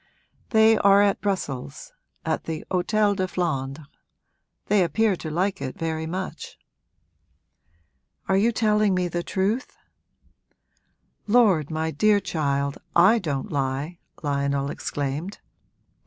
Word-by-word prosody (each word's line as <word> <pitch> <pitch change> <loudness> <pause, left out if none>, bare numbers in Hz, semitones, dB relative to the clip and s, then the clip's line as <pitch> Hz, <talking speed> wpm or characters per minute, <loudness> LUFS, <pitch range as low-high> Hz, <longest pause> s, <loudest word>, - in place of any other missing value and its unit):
'They 220 -1 +5
are 200 0 +6
at 200 -1 +1
Brussels, 195 - -4 0.3
at - - -1
the 160 -1 -5
Hôtel 205 +3 +2
de 185 -1 -1
Flandres. 150 -5 -3 0.8
They 205 -2 +3
appear 195 +5 +1
to 160 - -6
like 185 +5 -1
it 130 - -5
very 160 -1 -3
much.' 185 +3 -6 1.7
'Are 190 - +2
you 215 +5 +3
telling 215 -3 +2
me 180 -1 0
the 175 0 -2
truth?' 200 +7 -2 1.5
'Lord, 205 - +4
my 160 0 -2
dear 210 +3 +3
child, 140 -6 -2 0.2
I 195 +7 +6
don't 140 -8 -3
lie!' 140 +4 -2 0.2
Lionel 140 -1 -1
exclaimed. 145 +7 -4
180 Hz, 115 wpm, -24 LUFS, 145-205 Hz, 1.7 s, are